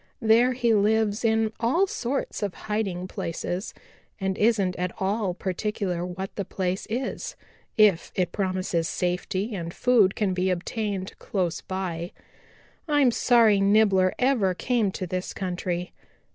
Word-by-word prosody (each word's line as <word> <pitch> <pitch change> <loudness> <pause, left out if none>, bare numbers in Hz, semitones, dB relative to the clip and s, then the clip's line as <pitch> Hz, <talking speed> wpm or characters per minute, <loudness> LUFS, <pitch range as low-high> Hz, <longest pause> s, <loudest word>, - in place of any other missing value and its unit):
There 235 +1 +4
he 240 -2 +2
lives 215 +1 +2
in 220 -1 +2
all 265 - +3
sorts 280 - -3
of 200 -3 -2
hiding 195 -4 -3
places, 175 +2 -4 0.5
and 190 -1 -1
isn't 205 -4 +2
at 180 0 -1
all 195 -1 0
particular 190 -1 -2
what 185 +2 -5
the 200 - -2
place 185 0 -3
is, 260 - -3 0.4
if 210 -6 +4
it 180 -2 0
promises 185 -4 -1
safety 185 +4 -2
and 170 -4 -4
food 220 -3 +3
can 200 -3 0
be 185 +1 0
obtained 195 +1 -2
close 180 -4 -2
by. 180 -2 -4 0.7
I'm 290 -4 +4
sorry 225 -4 +4
Nibbler 195 -2 +4
ever 240 -8 +2
came 235 -1 +1
to 185 - -4
this 180 +1 -4
country. 180 -1 -3
195 Hz, 135 wpm, -26 LUFS, 185-225 Hz, 0.7 s, There